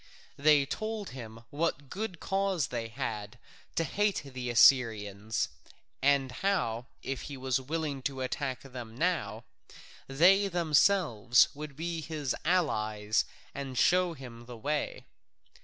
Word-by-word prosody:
They 145 -1 +5
told 215 +6 -4
him 115 -3 -9
what 145 -2 -1
good 190 +2 -5
cause 195 - 0
they 115 -2 -3
had 110 -4 -5 0.4
to 165 - +2
hate 205 +2 0
the 130 -2 -5
Assyrians, 110 -4 +4 0.5
and 135 -1 +3
how 125 - -1 0.2
if 135 +2 -4
he 140 - -6
was 130 0 0
willing 145 0 -3
to 135 -1 -7
attack 130 0 -2
them 125 -4 -9
now, 175 +3 0 0.6
they 185 +9 +5
themselves 160 - +4
would 150 -1 -8
be 165 +2 -3
his 150 -4 -2
allies 110 - +1 0.3
and 135 -2 -5
show 180 +3 +4
him 120 -5 -11
the 120 -1 -8
way. 145 +6 -2
140 Hz, 125 wpm, -30 LUFS, 120-170 Hz, 0.6 s, They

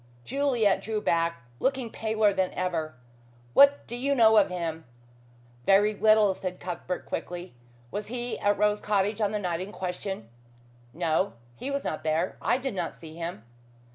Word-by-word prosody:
Juliet 255 -7 +2
drew 220 -1 -2
back, 170 -8 0 0.2
looking 265 -4 0
paler 220 -2 +1
than 190 -1 0
ever. 165 -6 -2 0.6
"What 280 0 +6
do 240 - -6
you 275 +3 0
know 220 -3 +6
of 205 - +5
him." 165 -3 -4 0.8
"Very 205 +2 +5
little," 215 -1 +5
said 185 -1 -5
Cuthbert 180 0 -4
quickly. 175 -4 -5 0.4
"Was 205 0 -4
he 240 +1 -4
at 205 0 +2
Rose 210 0 +2
Cottage 210 +1 0
on 205 -1 +2
the 210 - 0
night 180 -5 -2
in 190 +2 -6
question?" 185 - -4 0.6
"No. 170 +5 0 0.2
He 260 - -5
was 280 0 -2
not - - -3
there. 160 +3 0
I 245 - +2
did 265 -2 -3
not 175 -3 -3
see 160 -1 -11
him." 165 -10 -5
200 Hz, 165 wpm, -27 LUFS, 175-220 Hz, 0.8 s, What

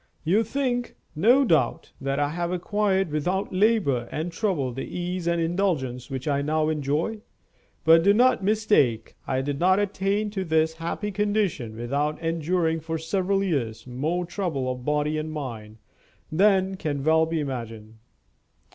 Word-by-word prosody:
You 190 +8 +3
think, 245 0 -2 0.2
no 245 - +5
doubt, 165 -9 +1
that 135 0 -1
I 145 0 +1
have 170 +2 -2
acquired 190 0 0
without 180 +7 -1
labor 185 - +2
and 160 +3 -3
trouble 165 - -1
the 135 - -5
ease 180 0 -4
and 170 0 +1
indulgence 165 -8 -1
which 135 +1 -5
I 140 -1 +1
now 155 +1 +1
enjoy. 155 +8 -1 0.6
But 165 +1 +7
do 200 +4 +5
not 240 -1 +4
mistake; 195 - +2
I 130 0 0
did 140 +1 -3
not 185 +2 +4
attain 205 +1 0
to 195 -2 -2
this 160 -1 +1
happy 170 +5 -3
condition 205 - -1
without 140 +6 -1
enduring 165 0 0
for 160 +1 -4
several 190 +4 0
years 130 - -2
more 155 +8 -2
trouble 165 -8 -2
of 125 -1 -6
body 150 +2 0
and 155 +1 -4
mind 115 -8 -6 0.5
than 190 +2 +3
can 145 -5 -3
well 160 +1 +4
be 165 0 -1
imagined. 115 -6 -6
165 Hz, 155 wpm, -25 LUFS, 140-195 Hz, 0.6 s, But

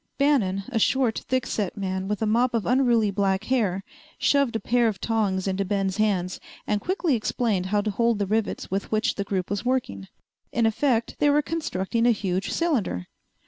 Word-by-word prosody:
Bannon, 225 -10 +2
a 240 -4 0
short, 250 0 +2
thickset 225 -6 -1
man 190 -1 -3
with 210 +2 -2
a - - +2
mop 235 +3 +2
of 225 - 0
unruly 240 -5 +3
black 195 0 0
hair 210 -6 0 0.3
shoved 280 -5 +2
a - - +1
pair 235 +3 +2
of 205 -4 -2
tongs 200 -4 0
into 195 +1 0
Ben's 195 -1 -1
hands 190 -4 0 0.3
and 210 -1 0
quickly 360 -4 0
explained 215 -4 0
how 205 +2 +1
to 210 0 -2
hold 230 +2 +1
the 200 - 0
rivets 215 0 -2
with 195 +1 -2
which 215 0 +1
the 200 - -3
group 190 -2 -2
was 205 -1 -2
working. 245 - -2 0.4
In 230 0 +1
effect 230 +1 +1
they 290 - +4
were 295 +1 +3
constructing 235 - -1
a - - +6
huge 190 -1 -2
cylinder. 230 - 0
215 Hz, 185 wpm, -25 LUFS, 195-245 Hz, 0.4 s, a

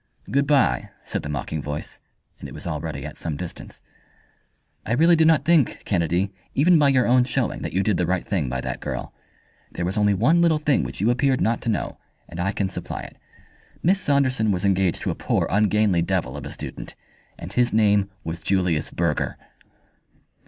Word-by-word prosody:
"Good 140 +1 +2
bye," 140 -4 +2 0.2
said - - -3
the 75 - -6
mocking 75 +1 -3
voice, 75 +1 -5 0.4
and - - -8
it - - -11
was - - -9
already - - -4
at - - -8
some 80 -4 -3
distance. 90 +1 -8 1.0
"I 115 - -2
really 165 +7 +5
do 160 0 +4
not 155 -4 +4
think, 160 -6 +2
Kennedy, 90 +1 0 0.2
even 165 +4 +5
by 145 -2 +5
your 130 -2 +3
own 125 +1 +4
showing 125 - -1
that - - -4
you 95 - +1
did 105 -4 +1
the 90 - 0
right 90 0 -1
thing 80 -10 -1
by 65 0 -2
that - - -4
girl. - - -5 0.6
There 85 - -3
was 95 +4 -1
only 105 -1 +3
one 165 - +3
little 165 -2 +4
thing 150 -3 +2
which - - -5
you 110 +4 +3
appeared 130 +1 +1
not 115 +1 +1
to 115 - -2
know, 110 - -2 0.3
and 85 - -9
I 95 +2 0
can 100 -1 -1
supply 95 - -5
it. - - -11 0.7
Miss 190 +3 +3
Saunderson 135 -7 +1
was 95 +1 -1
engaged 95 -2 +1
to - - 0
a - - -2
poor, - - 0
ungainly 105 -2 +3
devil 85 -7 -1
of - - -6
a - - -7
student, - - -7 0.4
and 90 +3 -8
his 120 +2 +2
name 105 -2 +3
was 80 +2 -5
Julius 90 -5 +1
Burger." 85 -3 -1
105 Hz, 200 wpm, -23 LUFS, 90-135 Hz, 1.0 s, really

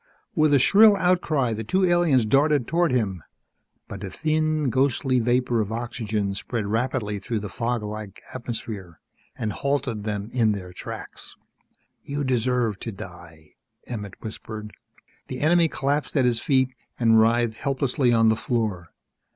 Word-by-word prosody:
With 155 -1 +3
a 145 - +6
shrill 205 - +6
outcry 165 -9 +1
the 110 +1 -4
two 185 - +2
aliens 175 -9 +3
darted 140 +3 +3
toward 170 +1 +1
him. 100 -8 0 0.7
But - - -8
a 95 - -4
thin, 155 - 0
ghostly 130 0 +2
vapor 120 0 +1
of 105 0 -3
oxygen 110 -3 -2
spread 110 +2 -3
rapidly 110 -1 -1
through 115 0 -3
the 105 - -5
fog 120 -1 -1
like 105 -1 -7
atmosphere, 110 -8 -6 0.4
and 105 -2 -2
halted 135 -6 -1
them 105 +1 -4
in 115 -4 +3
their 90 -3 -7
tracks. - - -8 0.7
"You 145 +1 -3
deserve 125 -4 0
to 115 - -5
die," 85 -6 -12 0.3
Emmett 105 -5 -7
whispered. 110 -1 -7 0.5
The 130 - -5
enemy 165 +2 +4
collapsed 145 0 -1
at 130 - +4
his 120 -2 +2
feet 130 -1 +2 0.3
and 115 -2 +5
writhed 115 0 +2
helplessly 135 -2 0
on 115 -1 +4
the 110 - +3
floor. 110 -8 -2
120 Hz, 150 wpm, -24 LUFS, 105-140 Hz, 0.7 s, a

